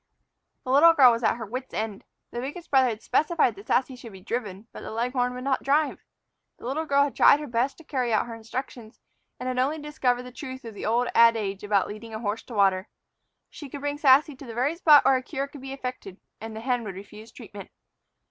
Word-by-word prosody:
The 255 - -3
little 320 +5 +7
girl 265 -6 +7
was 230 0 -1
at - - +2
her 230 -1 -6
wits' 255 +5 -7
end. 215 -2 -4 0.3
The 240 - -5
biggest 290 +7 -7
brother 265 -2 +5
had 220 -1 -6
specified 315 -7 +2
that 200 +1 -14
Sassy 260 0 +1
should 235 -4 -12
be 190 - -11
driven; 205 0 -5
but - - -10
the - - -7
leghorn 245 +2 -1
would 250 - -7
not 270 -1 0
drive. 290 +2 +1 0.6
The - - -13
little 305 +6 -2
girl 280 0 +4
had 285 - -3
tried 285 - +6
her 300 - -5
best 255 +1 -1
to 330 - -15
carry 255 -5 -2
out 215 - +2
her 235 - -8
instructions, 230 0 -7 0.4
and 250 - -6
had 255 0 -2
only 280 +5 +1
discovered 270 -5 -1
the 250 - -10
truth 260 -1 -8
of 225 - -8
the 205 - -5
old 240 +2 +1
adage 220 -4 +3
about 205 -2 +1
leading 220 +1 -8
a - - -4
horse 215 0 -3
to 240 - -9
water. 195 -1 +2 0.6
She 290 -4 -10
could 280 +1 -8
bring 290 0 -3
Sassy 285 +1 +5
to 275 - -11
the 230 - -8
very 265 +7 0
spot 305 -6 +6
where 270 0 +5
a - - -4
cure 275 +1 -4
could 280 -1 -12
be 265 0 -8
effected 250 -8 -7 0.2
and 225 0 -8
the 220 - -6
hen 245 0 -1
would 195 -4 -7
refuse 210 +3 -12
treatment. - - -11
250 Hz, 235 wpm, -26 LUFS, 225-275 Hz, 0.6 s, little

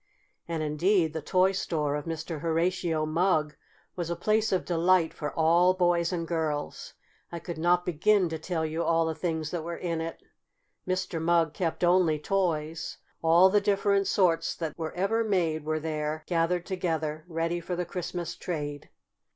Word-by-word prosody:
And, 165 -2 -2
indeed, 160 +2 +2
the 160 - -3
toy 185 +4 +3
store 155 -6 -1
of 150 - -4
Mr. 160 -1 -4
Horatio 165 -1 0
Mugg 155 -1 +1 0.4
was 175 -2 -3
a 170 - -1
place 215 +4 +1
of 185 - 0
delight 175 0 +2
for 150 -2 -4
all 170 +3 +4
boys 175 -1 +2
and 170 -2 -3
girls. 155 -3 -3 0.4
I 170 - -4
could 170 -1 -6
not 175 +2 +2
begin 185 +3 +3
to 160 -1 -4
tell 160 0 -2
you 160 +1 -2
all 165 0 +2
the 160 - -1
things 160 -2 -3
that 170 -3 -3
were 170 +1 -5
in 170 -2 -2
it. 165 0 -5 0.7
Mr. 185 -3 -2
Mugg 165 -1 +2
kept 170 +1 -2
only 175 -3 +4
toys. 160 -2 -1 0.2
All 170 +3 +6
the 205 0 +4
different 200 0 +2
sorts 175 -4 +2
that 160 -3 -4
were 160 -2 -5
ever 210 +5 +1
made 170 -7 0
were 155 0 0
there 155 0 -3
gathered 175 0 0
together, 160 -5 -2
ready 165 0 -1
for 175 +1 -4
the 180 0 -2
Christmas 175 -1 -4
trade. 145 -4 -5
170 Hz, 170 wpm, -28 LUFS, 160-180 Hz, 0.7 s, All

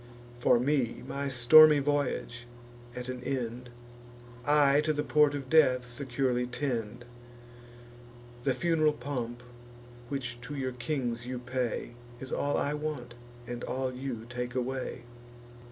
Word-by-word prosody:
For 120 - +4
me, 125 -3 0
my 140 +1 -3
stormy 150 +5 +8
voyage 140 -4 -1 0.5
at 125 0 -6
an 125 -1 -5
end, 125 -2 -3 0.8
I 145 -1 +5
to 155 0 0
the 150 0 -1
port 150 -1 +3
of 135 -2 -5
death 130 -5 +4
securely 125 -1 -1
tend. 120 -3 -3 1.4
The 135 -1 +1
fun'ral 155 0 +2
pomp 125 -5 -5 0.7
which 125 -4 -4
to 145 +4 -7
your 130 -2 -2
kings 125 -2 -3
you 130 0 -3
pay, 125 -1 -3 0.3
Is 130 +1 -8
all 145 0 0
I 145 - 0
want, 150 -5 -4 0.3
and 120 0 -6
all 130 0 -2
you 125 -3 -5
take 125 +1 -5
away." 130 0 -3
130 Hz, 130 wpm, -30 LUFS, 120-145 Hz, 1.4 s, stormy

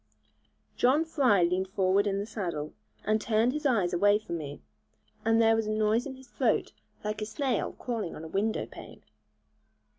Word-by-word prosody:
John 280 +6 +3
Fry 255 - +3
leaned 180 +2 +1
forward 190 +1 +2
in 195 -1 0
the 200 - -2
saddle, 175 -9 -4 0.3
and 215 0 +1
turned 225 +3 +2
his 300 0 0
eyes 200 -9 +1
away 205 +4 +4
from 170 -6 -5
me; 145 -1 -7 0.6
and 225 0 +3
then 225 -1 +5
there 225 - +5
was 225 -1 -1
a - - -1
noise 215 +4 +1
in 265 - -7
his 260 0 -15
throat - - 0 0.3
like 215 0 -3
a - - -1
snail 250 0 -1
crawling 230 -8 -4
on 155 - -8
a - - -6
window 200 +6 -1
pane. - - -12
215 Hz, 185 wpm, -29 LUFS, 190-235 Hz, 0.6 s, then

